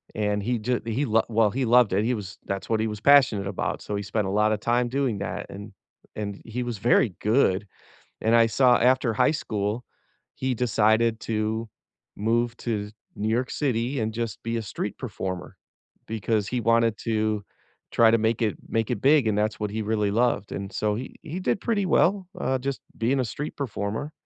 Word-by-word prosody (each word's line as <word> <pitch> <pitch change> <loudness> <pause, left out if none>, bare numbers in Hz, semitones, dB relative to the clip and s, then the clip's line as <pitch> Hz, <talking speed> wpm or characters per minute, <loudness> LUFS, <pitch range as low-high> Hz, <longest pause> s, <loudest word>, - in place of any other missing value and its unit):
and 105 -1 0
he 120 0 0
ju 125 +3 0
he 115 +5 -1
well, 115 -1 +2
he 130 +2 -1
loved 120 -4 +5
it, 100 +3 +2
he 125 - +1
was 100 -4 -6
that's 100 0 -4
what 110 -1 +2
he 110 - +1
was 105 -1 -5
passionate 125 -8 +5
about, 100 - -3
so 105 - -4
he 100 - -2
spent 105 0 -1
a - - -2
lotta 105 +1 +2
time 120 +3 +1
doing 130 -4 0
that, 100 +1 -4
and 100 +1 -9 0.4
and 100 -2 -5
he 120 +2 -3
was 120 -2 -4
very 110 -2 +3
good, 105 -3 +2 0.5
and 115 +1 +3
I 115 -1 +6
saw 125 +2 +4
after 125 -1 +3
high 125 +6 +3
school, 105 -4 -2 0.5
he 130 -1 -1
decided 115 -1 +2
to 110 +1 -2 0.5
move 115 +2 0
to 105 -3 -3 0.3
New 105 +1 -2
York 120 +3 0
City 130 -1 -1
and 110 0 -2
just 115 -3 -4
be 115 0 -2
a - - -2
street 105 - -5
performer 95 -2 -5 0.5
because 110 -1 -1
he 125 +2 -1
wanted 115 0 +3
to 110 -2 -1 0.5
try 115 -1 +5
to 115 - +4
make 110 +1 0
it 110 -3 0
make 115 -1 0
it 110 -4 -2
big, 140 -3 +5
and 105 -1 +1
that's 105 0 0
what 105 - -2
he 110 +1 -2
really 105 -1 0
loved, 115 -2 +1
and 100 0 -5
so 105 -1 0
he 125 +4 -6
he 160 +3 -5
did 190 - 0
pretty 210 -4 0
well, 185 +1 +2
uh, 130 - 0
just 135 +1 -3 0.2
being 125 +5 +1
a - - -1
street 145 +7 -5
performer, 115 +1 -3
115 Hz, 200 wpm, -25 LUFS, 105-125 Hz, 0.5 s, I